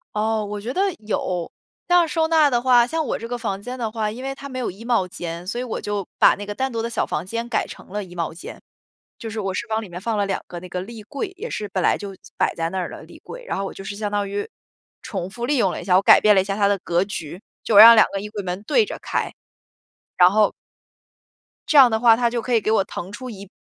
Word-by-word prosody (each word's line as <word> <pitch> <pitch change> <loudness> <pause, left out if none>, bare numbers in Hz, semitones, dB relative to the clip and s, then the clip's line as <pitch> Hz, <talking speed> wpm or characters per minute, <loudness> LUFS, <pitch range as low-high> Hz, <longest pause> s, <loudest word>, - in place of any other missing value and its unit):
哦， 215 0 0
我 205 0 -5
觉 240 +5 -4
得 375 - 0 0.2
有。 180 -5 -2 0.4
但 355 0 +5
要 335 - 0
收 320 0 +1
纳 315 -3 +5
的 240 -3 +1
话， 245 -2 +5
像 320 +4 -2
我 - - -2
这 230 - -6
个 245 +1 -3
房 200 -4 -4
间 250 +4 -6
的 230 -3 -3
话， 215 -1 -2
因 235 +5 -7
为 270 0 -3
它 280 +1 -9
没 260 - -6
有 250 - -2
衣 200 +5 -13
帽 235 -6 +2
间， 170 -1 -6
所 215 +6 -3
以 - - -3
我 245 - -4
就 205 -2 -3
把 - - +6
那 205 - -7
个 205 0 -6
单 265 +2 -1
独 230 -1 -2
的 230 - -3
小 235 - -1
房 150 - -3
间 230 +5 -4
改 240 - -1
成 - - -12
了 205 +2 -3
衣 180 -2 -13
帽 170 -2 -3
间。 170 - -10 0.6
就 230 - -6
是 220 0 -5
我 195 -1 -2
是 235 - -4
往 220 0 0
里 205 - -10
面 175 +1 -7
放 225 +1 -1
了 205 - +1
两 195 -1 -2
个 175 - -7
那 180 - -10
个 180 0 -3
立 220 +2 -9
柜， 280 - -4
也 470 +5 -6
是 210 - -4
本 185 -1 -2
来 - - +4
就 200 -1 -8 0.2
摆 - - +1
在 165 0 -2
那 190 - -2
儿 180 - -3
的 - - -9
立 - - -15
柜。 - - -10
然 - - -3
后 195 - -2
我 - - -6
就 195 - -9
是 200 +1 -6
相 210 0 -3
当 205 -1 -1
于 205 +1 -4 0.5
重 190 -4 -4
复 235 +4 -5
利 285 +3 +1
用 200 -6 +3
了 - - -5
一 - - -10
下， 180 - +3
我 - - +4
改 - - +7
变 215 - +6
了 195 - +4
一 - - -2
下 195 0 -2
它 200 -1 +2
的 200 -1 +1
格 175 0 0
局， 175 -4 -6 0.2
就 220 - 0
我 - - +10
让 230 +2 +12
两 215 - +7
个 195 - -3
衣 210 - -7
柜 210 -1 -5
门 185 +1 -5
对 445 - +3
着 - - -6
开。 - - -2 0.9
然 180 - +8
后 210 +1 +3 1.2
这 305 - +3
样 265 -3 +9
的 220 -1 0
话 230 -1 +6
它 240 0 +1
就 235 0 -2
可 250 - -3
以 230 - +4
给 215 - 0
我 220 -3 +3
腾 185 0 -7
出 255 +5 -7
一 200 -4 -10
210 Hz, 315 characters per minute, -22 LUFS, 195-240 Hz, 1.2 s, 让